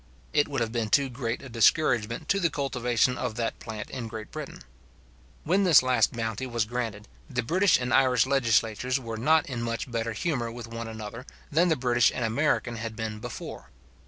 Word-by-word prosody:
It 145 -1 +3
would 135 -4 -2
have 115 -1 -1
been 115 -2 -1
too 140 +3 +3
great 120 -1 -4
a - - -8
discouragement 115 +2 +2
to 200 - +3
the 170 -3 +2
cultivation 125 -4 0
of 120 -3 -3
that 115 0 -2
plant 110 -2 -7
in 125 -3 -5
Great 110 -1 -8
Britain. - - -7 0.8
When 190 +5 +2
this 170 -8 +7
last 130 0 +2
bounty 115 +1 -3
was 115 -3 0
granted, 110 -3 -4 0.2
the 130 - -1
British 185 - +3
and 125 0 -2
Irish 125 -3 +4
legislatures 125 -1 +1
were 115 -3 -6
not 155 +7 +3
in 125 -4 -4
much 115 +2 -3
better 115 -1 -2
humour 120 -4 -2
with 120 0 -7
one 115 0 -6
another, 110 +3 -8 0.2
than 170 +4 +3
the 160 - +3
British 120 -3 +3
and 120 - -1
American 120 0 0
had 110 0 -5
been 110 -1 -4
before. - - -8
120 Hz, 190 wpm, -27 LUFS, 115-135 Hz, 0.8 s, this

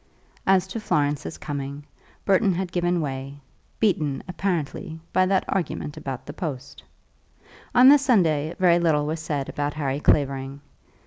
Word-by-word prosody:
As 190 -1 +4
to 225 - -4
Florence's 145 -7 -1
coming, 140 0 -5 0.4
Burton 195 -1 +3
had 185 0 -3
given 175 0 0
way, 135 -1 -5 0.4
beaten, 155 -10 +1
apparently, 175 -2 -3
by 185 0 +3
that 190 0 +1
argument 170 -5 -2
about 135 -2 -6
the 145 - -7
post. 135 -6 -6 0.9
On 250 +1 +8
the 290 +2 +8
Sunday 170 - +2
very 175 -2 +4
little 155 -4 +2
was 160 +2 -2
said 145 -3 -3
about 145 0 -3
Harry 140 -2 -2
Clavering. 140 -2 +1
155 Hz, 140 wpm, -24 LUFS, 140-185 Hz, 0.9 s, On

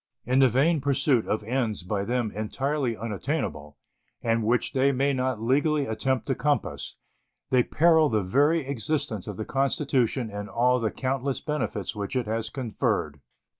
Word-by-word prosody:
In 130 +2 +2
the 135 -1 +6
vain 145 +6 +2
pursuit 140 -3 +2
of 110 - -1
ends 115 -4 -1
by 100 +2 -2
them 120 0 -1
entirely 130 +3 -2
unattainable, 105 - -3 0.5
and 115 -1 +1
which 120 +3 +1
they 135 +1 +3
may 140 +1 +1
not 130 -3 -1
legally 145 +4 +2
attempt 130 +2 -1
to 135 - 0
compass, 145 +2 -1 0.6
they 130 -1 +5
peril 160 +3 +4
the 110 -3 +1
very 145 - +2
existence 140 - -2
of 105 -3 -5
the 110 - -4
Constitution 135 -4 0
and 105 0 -6
all 125 +2 +2
the 115 -2 0
countless 135 +2 -2
benefits 150 -6 -3
which 100 +3 -4
it 125 -2 0
has 110 +1 -2
conferred. 110 - -2
125 Hz, 160 wpm, -26 LUFS, 110-140 Hz, 0.6 s, the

